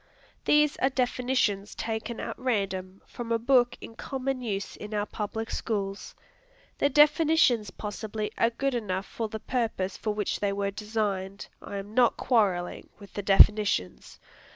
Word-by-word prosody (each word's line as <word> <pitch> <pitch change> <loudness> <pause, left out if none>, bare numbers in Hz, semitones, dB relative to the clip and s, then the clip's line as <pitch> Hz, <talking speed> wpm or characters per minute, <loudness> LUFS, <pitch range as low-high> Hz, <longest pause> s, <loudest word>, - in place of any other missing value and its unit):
These 300 -1 +4
are 265 - +2
definitions 245 -5 0
taken 225 +1 -4
at - - -4
random 195 -6 -2
from 235 -2 -7
a 230 - +3
book 245 +1 +3
in - - -9
common 265 +2 -3
use 200 -4 -3
in 210 0 -7
our 205 0 0
public 220 +1 -4
schools. 200 -3 -3 0.6
The 285 - +3
definitions 295 - +4
possibly 210 +1 -5
are 230 - +3
good 270 +3 -1
enough 200 -5 -2
for 225 -2 -4
the 220 - -5
purpose 220 -6 -2
for 215 - -2
which 210 -2 -1
they 200 -1 0
were 200 0 -1
designed. 205 -2 -3
I 200 - -6
am 200 +2 -7
not 245 0 +4
quarrelling 195 -8 +1
with 200 -2 -14
the 205 - -3
definitions. 200 - +3
215 Hz, 155 wpm, -28 LUFS, 200-245 Hz, 0.6 s, These